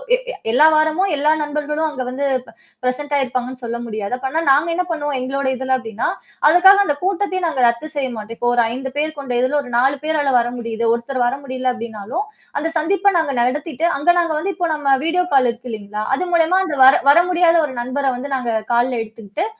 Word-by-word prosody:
எ -, -, -2 dB, 0.3 s
எல்லா 285 Hz, +6 st, +5 dB
வாரமும் 315 Hz, +5 st, +2 dB
எல்லா 295 Hz, +2 st, +2 dB
நண்பர்களும் 300 Hz, +1 st, -2 dB
அங்க 260 Hz, -4 st, -5 dB
வந்து 270 Hz, +3 st, -3 dB, 0.2 s
ப் 225 Hz, -, -15 dB, 0.3 s
பிரசென்ட் 285 Hz, +4 st, -2 dB
ஆயிருப்பாங்கன்னு 255 Hz, -1 st, -3 dB
சொல்ல 235 Hz, 0 st, -3 dB
முடியாது. 215 Hz, -1 st, -5 dB
அப்ப 265 Hz, +1 st, -4 dB
ஆனா 325 Hz, -, 0 dB
நாங்க 295 Hz, +5 st, +3 dB
என்ன 360 Hz, -, 0 dB
பண்ணுவோம், 295 Hz, -3 st, -2 dB
எங்களோட 270 Hz, +2 st, -2 dB
இதுல 260 Hz, +1 st, 0 dB
அப்டின்னா, 225 Hz, -3 st, -4 dB, 0.4 s
அதுக்காக 365 Hz, +4 st, +7 dB
அந்த 290 Hz, -, 0 dB
கூட்டத்தையும் 375 Hz, -1 st, -1 dB
நாங்க 275 Hz, -6 st, -1 dB
ரத்து 235 Hz, +6 st, -1 dB
செய்ய 275 Hz, -2 st, -1 dB
மாட்டேம். 220 Hz, +2 st, -8 dB
இப்போ 240 Hz, -, +1 dB
ஒரு 240 Hz, -, +4 dB
5 265 Hz, +1 st, -5 dB
பேர் 310 Hz, +1 st, -1 dB
கொண்ட 265 Hz, -3 st, -4 dB
இதுல 260 Hz, +4 st, +1 dB
ஒரு 250 Hz, -3 st, -10 dB
4 265 Hz, +3 st, +3 dB
பேரால 305 Hz, -3 st, 0 dB
வர 235 Hz, -, 0 dB
முடியுது. 230 Hz, -1 st, -4 dB
ஒருத்தர் 245 Hz, +2 st, -3 dB
வர 245 Hz, -, -1 dB
முடியல 255 Hz, -1 st, -2 dB
அப்டினாலும், 235 Hz, -, -5 dB, 0.3 s
அந்த 300 Hz, +3 st, -1 dB
சந்திப்ப 390 Hz, +4 st, +1 dB
நாங்க 315 Hz, -3 st, -1 dB
நடத்திட்டு, 295 Hz, +5 st, -1 dB
அங்க 290 Hz, -, +1 dB
நாங்க 335 Hz, -2 st, 0 dB
வந்து 390 Hz, +5 st, -2 dB
இப்போ 350 Hz, -1 st, -1 dB
நம்ம 275 Hz, -3 st, +2 dB
வீடியோ 360 Hz, +2 st, +1 dB
கால் 255 Hz, -2 st, +4 dB
இருக்கு 245 Hz, +1 st, -11 dB
இல்லைங்களா? 210 Hz, -1 st, -5 dB
அது 365 Hz, -, -2 dB
மூலியமா 340 Hz, +2 st, +3 dB
அந்த 305 Hz, -, -3 dB
வர 265 Hz, -, +8 dB, 0.2 s
வர -, -, +4 dB
முடியாத 345 Hz, -1 st, +4 dB
1 265 Hz, -, -8 dB
நண்பர 255 Hz, +3 st, -3 dB
வந்து 280 Hz, +3 st, -6 dB
நாங்க 250 Hz, -3 st, -2 dB, 0.2 s
கால்ல 245 Hz, +2 st, +2 dB
எடுத்துக்கிட்டு, 220 Hz, -, -6 dB
275 Hz, 205 wpm, -19 LUFS, 245-315 Hz, 0.4 s, வர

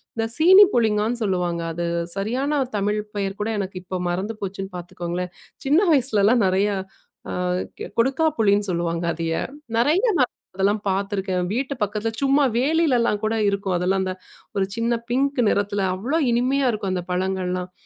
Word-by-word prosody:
இந்தச் 225 Hz, 0 st, -1 dB
சீனி 375 Hz, +5 st, +8 dB
புளிங்கான்னு 220 Hz, +1 st, +1 dB
சொல்லுவாங்க. 180 Hz, -3 st, -1 dB
அது 170 Hz, +1 st, -3 dB, 0.3 s
சரியான 260 Hz, +9 st, -1 dB, 0.2 s
தமிழ் 210 Hz, +1 st, 0 dB, 0.2 s
பெயர் 195 Hz, -1 st, -2 dB
கூட 215 Hz, -, -1 dB
எனக்கு 190 Hz, -1 st, -4 dB
இப்போ 185 Hz, 0 st, -4 dB
மறந்து 190 Hz, +6 st, -2 dB
போச்சுன்னு 195 Hz, -1 st, -5 dB
பாத்துக்கோங்களேன். 175 Hz, 0 st, -5 dB, 0.3 s
சின்ன 290 Hz, +5 st, +4 dB
வயசுலல்லாம் 235 Hz, -5 st, +3 dB
நெறைய 195 Hz, +3 st, +2 dB, 0.6 s
அ -, -, -3 dB, 0.7 s
கொடுக்காப்புளின்னு 230 Hz, -7 st, +2 dB
சொல்லுவாங்க 170 Hz, 0 st, -1 dB
அதைய. 165 Hz, 0 st, -2 dB, 0.4 s
நெறைய 300 Hz, -, +3 dB, 0.2 s
நாளா 255 Hz, -, +4 dB, 0.3 s
அதெல்லாம் 205 Hz, +2 st, +1 dB
பாத்திருக்கேன். 195 Hz, -1 st, -1 dB
வீட்டு 265 Hz, +4 st, -1 dB
பக்கத்துல 210 Hz, +2 st, -2 dB
சும்மா 275 Hz, +1 st, +3 dB, 0.2 s
வேலியில 305 Hz, -1 st, +2 dB
எல்லாம் 210 Hz, -3 st, +1 dB
கூட 220 Hz, +1 st, 0 dB
இருக்கும். 195 Hz, -2 st, -1 dB
அதெல்லாம் 190 Hz, +2 st, +1 dB
அந்த 185 Hz, 0 st, -2 dB, 0.4 s
ஒரு 195 Hz, -, +2 dB
சின்ன 230 Hz, +1 st, 0 dB, 0.2 s
பிங்க் 275 Hz, +1 st, +1 dB
நிறத்துல 205 Hz, 0 st, 0 dB
அவ்வளவு 270 Hz, -, 0 dB
இனிமையா 260 Hz, +3 st, +1 dB
இருக்கும் 205 Hz, -3 st, -3 dB
அந்தப் 180 Hz, 0 st, -4 dB
பழங்கள் 185 Hz, 0 st, -1 dB
எல்லாம். 180 Hz, 0 st, -4 dB
205 Hz, 150 wpm, -23 LUFS, 185-245 Hz, 0.7 s, சீனி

